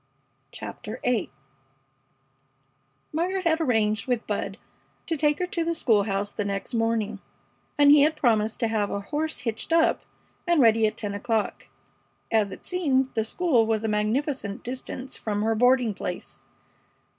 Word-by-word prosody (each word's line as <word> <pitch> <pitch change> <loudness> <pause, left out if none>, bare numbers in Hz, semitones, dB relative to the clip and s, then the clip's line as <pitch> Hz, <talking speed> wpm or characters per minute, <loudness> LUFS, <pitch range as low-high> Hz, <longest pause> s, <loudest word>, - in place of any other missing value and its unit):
CHAPTER - - -7
VIII 240 -6 +1 1.8
Margaret 365 +4 -1
had 325 0 +2
arranged 220 -6 +1
with 245 -3 0
Bud - - -3 0.5
to 330 - -1
take 295 -1 +2
her 365 - -1
to 345 -2 -2
the 335 0 -1
school 220 -10 +3
house 200 0 -1
the 210 - -3
next 200 +2 -4
morning, 225 -2 0 0.6
and 290 -1 +7
he 295 -1 +8
had 310 +2 +3
promised 225 -6 +1
to 230 - +3
have 215 -2 0
a 200 - -2
horse 300 +6 -3
hitched 230 +4 -4
up 330 0 +3 0.5
and 345 -2 +3
ready 225 -3 +5
at 215 +1 -5
ten 205 -2 -4
o'clock, 220 +1 -2 0.6
as 215 -3 +2
it - - -10
seemed 270 -8 +1
the 220 - +1
school 245 -2 +2
was 220 -1 0
a - - 0
magnificent 215 +1 -1
distance 255 +1 -6
from 210 -1 -2
her 225 +1 +2
boarding 245 0 +3
place. - - -6
230 Hz, 155 wpm, -26 LUFS, 215-295 Hz, 1.8 s, he